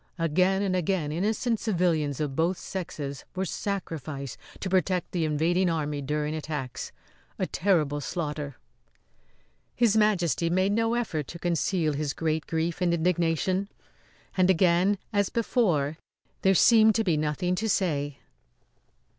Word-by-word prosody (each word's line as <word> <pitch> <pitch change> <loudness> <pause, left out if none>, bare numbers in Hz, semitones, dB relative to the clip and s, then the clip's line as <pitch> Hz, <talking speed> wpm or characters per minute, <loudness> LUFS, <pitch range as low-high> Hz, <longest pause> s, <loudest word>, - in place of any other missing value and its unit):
Again 185 +4 +2
and 190 -2 0
again 180 -4 0
innocent 215 +7 0
civilians 170 - 0
of 145 -3 -2
both 170 +4 +1
sexes 150 -7 -5
were 190 +1 -1
sacrificed 155 - -4 0.2
to - - -3
protect 185 -1 +1
the 170 -3 0
invading 170 +4 +2
army 150 -3 -2
during 150 +2 -2
attacks. 150 -5 -5 0.5
A - - 0
terrible 155 -7 +1
slaughter!" 150 -3 -4 1.2
His 235 -3 +3
Majesty 180 -6 +2
made 185 +3 +2
no 225 +2 +1
effort 165 - -2
to 170 - -8
conceal 170 -1 0
his 145 -1 -2
great 160 -1 -1
grief 165 +2 -2
and 175 -1 +3
indignation. 175 +3 0 0.7
And 185 -1 +3
again, 185 +2 +3 0.2
as 200 -1 +2
before, 170 - +1 0.4
there 190 0 +4
seemed 220 +1 +6
to 225 - +2
be 175 -6 +2
nothing 155 +4 0
to 220 +4 -1
say. 145 -8 0
170 Hz, 135 wpm, -27 LUFS, 150-190 Hz, 1.2 s, seemed